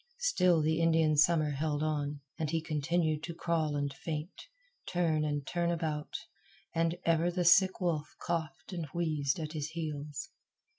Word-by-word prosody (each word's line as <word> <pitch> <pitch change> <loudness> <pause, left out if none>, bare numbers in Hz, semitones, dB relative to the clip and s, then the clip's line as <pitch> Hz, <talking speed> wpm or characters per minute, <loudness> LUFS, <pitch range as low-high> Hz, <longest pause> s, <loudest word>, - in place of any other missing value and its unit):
Still 180 - +3
the 160 +2 +2
Indian 160 -2 +4
Summer 155 0 +4
held 145 +1 -1
on, 145 -2 -1 0.2
and 155 -2 -1
he 165 +1 +1
continued 155 0 0
to 170 0 -6
crawl 165 -3 0
and 145 -1 -1
faint, 155 +2 -6 0.4
turn 165 -4 +1
and 145 -2 -1
turn 170 +3 0
about; 160 -3 -2 0.6
and 165 +1 +1
ever 165 +1 +3
the 175 0 -1
sick 190 +2 +6
wolf 165 -5 -1
coughed 165 0 -3
and 170 -3 -3
wheezed 155 -2 0
at 155 0 -4
his 155 -1 -3
heels. 155 - -5
160 Hz, 155 wpm, -32 LUFS, 150-170 Hz, 0.6 s, sick